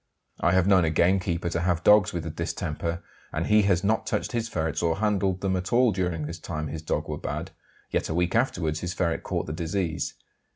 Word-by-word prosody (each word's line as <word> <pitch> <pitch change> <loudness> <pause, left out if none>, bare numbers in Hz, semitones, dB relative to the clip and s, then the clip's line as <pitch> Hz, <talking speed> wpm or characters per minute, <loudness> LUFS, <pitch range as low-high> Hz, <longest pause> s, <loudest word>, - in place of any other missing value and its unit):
I 85 - +2
have 95 -1 +4
known 95 -2 +5
a 80 - +2
gamekeeper 85 +1 +1
to 85 - -1
have 85 0 0
dogs 105 -3 +6
with 85 -2 -3
the 80 - -4
distemper, 85 +1 -3 0.3
and 80 +2 -2
he 105 0 +5
has 90 -2 +2
not 110 +2 +1
touched - - -1
his 115 -1 -2
ferrets 80 -5 -1
or 85 -1 +2
handled 100 -3 +1
them 95 -1 +1
at 90 0 -3
all 125 -1 +5
during 90 -5 -1
the 80 - -5
time 80 -2 -5
his 80 +2 -5
dogs 80 - -2
were - - -4
bad, - - -4 0.4
yet - - 0
a 80 - -1
week 90 0 +1
afterwards 85 -10 +1
his 90 +1 -4
ferrets 85 -2 0
caught - - -2
the 75 - -5
disease. 85 0 -2
90 Hz, 220 wpm, -26 LUFS, 80-95 Hz, 0.4 s, dogs